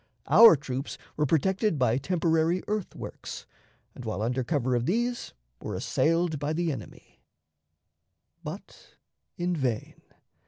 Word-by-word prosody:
Our 205 +5 +9
troops 135 -1 -5 0.2
were 150 -1 +1
protected 190 - +1
by 125 -1 +2
temporary 165 +2 +1
earthworks, 210 -3 -5 0.5
and - - -10
while 100 +4 -3
under 125 +3 0
cover 130 -2 0
of 120 0 0
these 240 +5 -1 0.3
were - - -4
assailed 165 -1 +1
by 145 +2 -1
the 170 0 0
enemy: 110 -10 -10 1.2
"But - - -10 0.4
in 175 0 -1
vain. 125 -7 -2
160 Hz, 120 wpm, -28 LUFS, 130-175 Hz, 1.2 s, Our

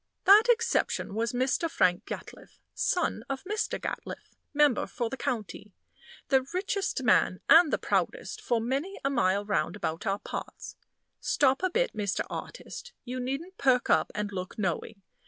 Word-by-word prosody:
That 415 +3 +8
exception 465 - +1
was 225 +2 -1
Mr. 260 +6 0
Frank 180 - +2
Gatliffe, - - -9 0.2
son 355 -10 0
of 270 -1 -3
Mr. 425 +3 -2
Gatliffe, - - -6 0.2
member 295 -3 +3
for 235 -2 -3
the - - -2
county, 210 -5 -4 0.6
the 265 -1 +3
richest 390 +1 -1
man - - +3
and 335 -4 +7
the - - +2
proudest - - -2
for 240 -2 +1
many 275 - -2
a 275 - +2
mile 205 -5 +2
round 200 -2 0
about 165 -5 -3
our 195 0 +1
parts. - - -7 0.4
Stop 270 0 +2
a 370 - +1
bit, - - 0
Mr. 200 -2 -1
Artist, 485 -1 -7
you 255 +1 -4
needn't 275 +9 -4
perk 255 -2 +3
up - - +3
and 210 -1 -2
look 185 -2 -6
knowing. 195 +1 -3
255 Hz, 155 wpm, -28 LUFS, -, 0.6 s, That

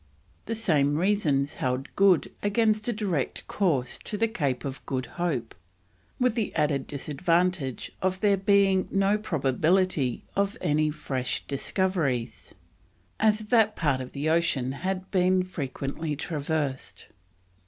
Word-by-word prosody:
The 230 - -1
same 150 -9 +2
reasons 155 -7 +1
held 130 +1 -2
good 195 -3 +4
against 215 +1 +1
a - - +2
direct 195 - -2
course 145 -11 0
to 210 - -5
the 225 +2 +2
Cape 145 - -2
of 135 -1 -5
Good 130 -2 -2 0.2
Hope, 140 -10 -1 0.7
with 250 -2 +3
the 225 -3 -1
added 145 -3 +1
disadvantage 155 0 -1
of 185 0 0
there 205 -1 +4
being 195 -1 +3
no 195 +2 +2
probability 160 - +1
of 200 +3 0
any 155 +1 +2
fresh 130 -4 -3
discoveries, 140 - -1 0.6
as 215 0 +3
that 225 -3 +5
part 140 -5 +1
of 130 - -8
the 145 +2 -2
Ocean 160 -6 +1
had 185 +6 -4
been 185 -1 +3
frequently 150 -2 -4
traversed. 150 -3 -3
170 Hz, 130 wpm, -27 LUFS, 140-195 Hz, 0.7 s, that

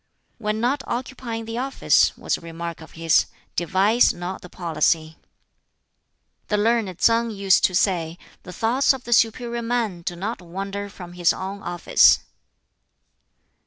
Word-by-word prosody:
"When 215 -1 -2
not 260 +5 0
occupying 240 -2 -4
the 225 +1 -4
office," 270 +1 +2
was - - -1
a - - -9
remark 170 0 -7
of 160 - -13
his, 165 -1 +2 0.3
"devise 195 +7 +3
not 175 +2 -6
the 180 - -11
policy." 160 -2 0 1.3
The 210 - 0
Learned 215 -4 +1
Tsang 230 0 +3
used 195 -3 +2
to 185 - 0
say, 175 -3 +1 0.2
"The 180 - -10
thoughts 240 +9 +2
of 260 -2 -8
the 240 - -1
'superior 235 +1 +1
man' 230 -6 -2
do 175 +1 -4
not 200 +4 -4
wander 195 +3 -5
from 180 -3 -11
his 175 -1 +2
own 195 +1 -6
office." 175 -2 +4
200 Hz, 145 wpm, -23 LUFS, 175-230 Hz, 1.3 s, office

